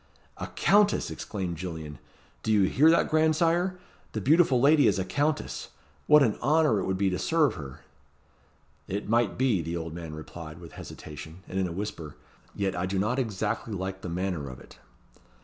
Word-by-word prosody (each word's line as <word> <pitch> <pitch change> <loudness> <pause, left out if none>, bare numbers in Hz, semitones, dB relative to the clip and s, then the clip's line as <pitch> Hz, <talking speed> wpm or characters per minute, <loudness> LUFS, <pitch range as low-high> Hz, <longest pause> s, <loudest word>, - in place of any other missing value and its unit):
"A - - -5
Countess!" 205 +1 +3
exclaimed 95 -5 -4
Gillian. 80 -4 -6 0.4
"Do 110 - -1
you 105 -2 +4
hear 145 +11 +5
that, 165 - +4
grandsire? 165 +3 +2 0.4
The 110 - -2
beautiful 145 - +4
lady 145 +3 +5
is 95 - +2
a 95 - -1
countess. 145 +8 -1 0.4
What 150 -1 +7
an 110 -5 +1
honour 150 -5 +3
it - - -2
would 95 0 -1
be 95 -1 +1
to 90 - -2
serve 160 -3 +2
her!" 70 -6 -9 1.1
"It 100 +2 -3
might 120 +2 +1
be," 125 -8 +2
the 85 +2 -3
old 80 -1 -5
man 80 -2 -7
replied, 80 +1 -9
with 85 -1 -11
hesitation, 80 +4 -10
and 95 - -3
in 95 - +1
a - - -6
whisper; 85 -5 -5 0.4
"yet 100 -1 -1
I 90 +1 -1
do 95 +1 -2
not 110 +7 +1
exactly 110 -1 -2
like 95 0 -4
the 90 - -5
manner 85 -5 -2
of 65 0 -9
it." - - -16
100 Hz, 185 wpm, -28 LUFS, 85-140 Hz, 1.1 s, What